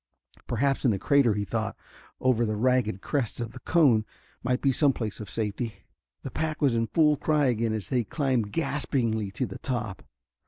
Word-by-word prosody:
Perhaps 140 0 0
in 130 - +4
the 105 - +1
crater, 130 -1 +3
he 105 0 -1
thought, - - -3 0.4
over 125 -2 +2
the 110 -2 0
ragged 115 -4 +1
crest 135 -6 -2
of 115 -2 -4
the - - -10
cone, 140 -10 +4 0.4
might 125 +1 0
be 135 - +2
some 140 +1 +3
place 110 -5 -4
of 105 -2 -7
safety. 110 +1 -3 0.4
The 135 - -5
pack 155 +2 -2
was 140 -4 +3
in 115 0 +1
full 150 0 +3
cry 150 0 +2
again 115 -3 +1
as 110 -3 -3
they 125 -2 +1
climbed 125 -4 -1
gaspingly 120 -9 -1
to 130 - -1
the 95 - -8
top. 110 -7 -3
120 Hz, 190 wpm, -27 LUFS, 110-140 Hz, 0.4 s, in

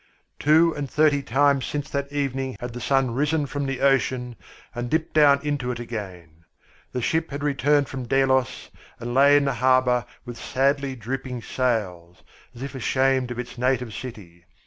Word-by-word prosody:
Two 160 +3 +4
and 145 -2 -4
thirty 150 -1 +3
times 140 +1 +2
since 145 0 -3
that 140 0 -3
evening 135 -2 -2
had 120 -1 -6
the 120 - -7
sun 135 -1 +1
risen 150 +4 0
from 140 0 -3
the 135 -1 -3
ocean 130 -3 +1 0.4
and 120 0 -4
dipped 160 +3 -1
down 145 -2 +5
into 145 -4 -2
it 120 -1 -3
again. 90 -9 -8 0.5
The 125 - -3
ship 160 +4 0
had 140 +1 -5
returned 145 0 +2
from 130 -2 -6
Delos 130 0 +1 0.3
and 120 +1 -5
lay 140 +2 +6
in 145 - +2
the 135 - 0
harbour 125 0 +2 0.2
with 120 -1 -8
sadly 140 0 0
drooping 125 +1 -5
sails, 95 -9 -2 0.3
as 120 - -8
if 140 - -6
ashamed 130 0 +1
of 120 - -5
its 125 0 -7
native 125 -2 0
city. 95 -10 -9
130 Hz, 170 wpm, -24 LUFS, 120-140 Hz, 0.5 s, lay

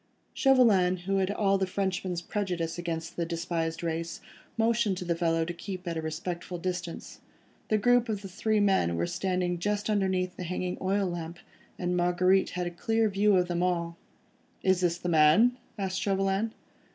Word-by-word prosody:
Chauvelin, 205 -10 +4
who 195 0 +1
had 190 0 +1
all 195 -1 +2
the 190 - 0
Frenchman's 185 -2 -2
prejudice 175 -5 -2
against 165 -1 -4
the 170 - 0
despised 165 -1 -3
race, 165 0 -3 0.4
motioned 225 -3 +2
to 180 - -5
the 170 -1 0
fellow 165 -1 +1
to 175 - -4
keep 185 +1 -7
at 170 - -2
a 160 - -2
respectful 170 +3 -4
distance. 180 -1 -5 0.5
The 215 - +2
group 245 +2 +3
of 210 -2 -2
the - - -5
three 210 +3 0
men 190 - +2
were 85 +1 0
standing 180 - -1
just 205 +3 -1
underneath 185 -3 0
the - - -5
hanging 180 +1 -3
oil 195 +1 +1
lamp, 170 -1 -5 0.4
and 180 0 -1
Marguerite 180 +2 +3
had 180 - -1
a 175 - -3
clear 225 +5 +1
view 200 +1 +3
of 180 -1 +3
them 175 -1 -1
all. 170 -2 0 0.7
"Is 190 -1 +3
this 175 -1 +1
the 180 - -5
man?" 170 +10 +5 0.2
asked 190 -2 -2
Chauvelin. 195 +2 0
180 Hz, 175 wpm, -28 LUFS, 170-200 Hz, 0.7 s, man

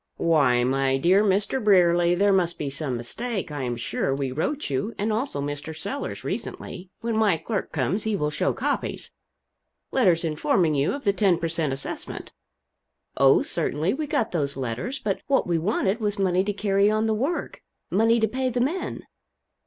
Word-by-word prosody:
"Why, 140 -7 +3
my 135 +1 +1
dear 185 +8 +4
Mr. 205 +5 +1
Brierly, 175 -3 +4
there 200 +2 +3
must 175 -3 +1
be 145 -2 -3
some 135 -3 -2
mistake, 195 - -4
I 145 -2 -4
am 120 -2 -2
sure 120 +3 -1
we 135 -2 -2
wrote 270 - -2
you 135 - -2
and 215 +2 0
also 230 - -2
Mr. 145 +2 -5
Sellers, 235 - -5
recently 180 0 -6
when 230 -1 -1
my 210 -6 +3
clerk 195 +5 -3
comes 160 - 0
he 220 -1 0
will 150 -5 -1
show - - 0
copies - - -3 0.8
letters 180 -10 +3
informing 160 +1 +1
you 140 +1 +1
of 280 0 -6
the 200 - +2
ten 195 -4 +3
per 170 0 -2
cent. 160 -3 0
assessment." 135 +1 -5 0.8
"Oh, 135 0 +5
certainly, 155 +6 -1
we 300 +3 -3
got 230 - 0
those 140 -5 -1
letters. 130 - -3
But 210 -7 -2
what 275 -1 +2
we 170 -2 0
wanted 195 +4 0
was 210 -1 -1
money 185 -1 +2
to 205 - 0
carry 200 0 +2
on 215 +1 +1
the 220 - +1
work 275 +11 -2 0.3
money 225 +4 +3
to 220 - +3
pay 255 +3 -1
the 245 0 -2
men." 300 +10 -2
185 Hz, 185 wpm, -25 LUFS, 150-220 Hz, 0.8 s, Oh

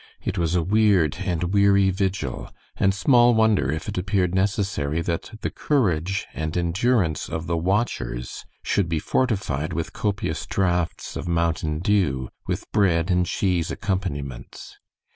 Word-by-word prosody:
It - - -2
was 85 0 0
a 85 - +2
weird 95 -5 +3
and 90 -1 -1
weary 100 -1 +4
vigil, 95 -9 -2 0.3
and 95 - +3
small 120 +4 +4
wonder 110 -11 +3
if 80 - -4
it - - -2
appeared 95 -1 0
necessary 95 -6 0
that 85 -1 -3
the - - -2
courage 100 - 0
and 80 +1 -3
endurance 90 0 +1
of 80 +1 -4
the 85 0 -1
watchers 85 - -2 0.2
should 95 -5 0
be 80 - 0
fortified 90 - -1
with 85 - -3
copious 105 -1 -2
draughts 90 -3 -1
of - - -5
"mountain 85 -2 0
dew," 80 -11 +1 0.2
with - - -2
bread 90 -3 +2
and 90 -1 +2
cheese 90 -3 0
accompaniments. 75 - -4
90 Hz, 140 wpm, -24 LUFS, 80-100 Hz, 0.3 s, weary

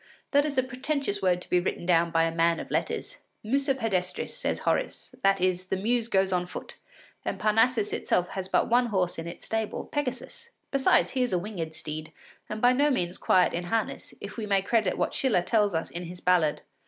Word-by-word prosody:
That 285 +1 +4
is 285 -2 -4
a 260 - +4
pretentious 260 -4 -2
word 180 -1 +2
to - - -12
be 180 - +5
written 175 -1 -3
down 170 -1 +3
by 165 0 +2
a 165 0 0
man 165 0 +2
of - - -8
letters! - - -2 0.2
Musa 270 +4 +1
pedestris, 195 -8 -2
says - - -1
Horace; - - -1
that 195 0 +3
is, 185 0 0
the 190 - 0
Muse 230 +3 0
goes 190 -4 +2
on 180 0 0
foot, - - -8 0.5
and - - -3
Parnassus 225 +1 +2
itself 180 0 0
has 190 -1 -5
but - - +2
one 245 +1 +3
horse 185 -6 0
in 165 - -5
its 170 - -8
stable, 225 -1 -2
Pegasus. 290 - -4 0.2
Besides, 275 -1 +3
he 260 - -1
is 245 -6 0
a - - +3
winged 170 -4 -5
steed 155 0 -6 0.4
and 215 +2 -5
by 245 +1 +6
no 285 +3 +3
means 180 -10 -1
quiet 185 -1 +3
in 175 +1 -3
harness, 225 +4 -2
if 200 - -8
we 220 -2 -3
may 195 -1 +2
credit 215 -3 +1
what - - 0
Schiller 235 -10 +2
tells 205 -2 +2
us 160 - -2
in 175 +1 -5
his 175 +1 -8
ballad. 175 -5 +2
195 Hz, 215 wpm, -27 LUFS, 180-245 Hz, 0.5 s, by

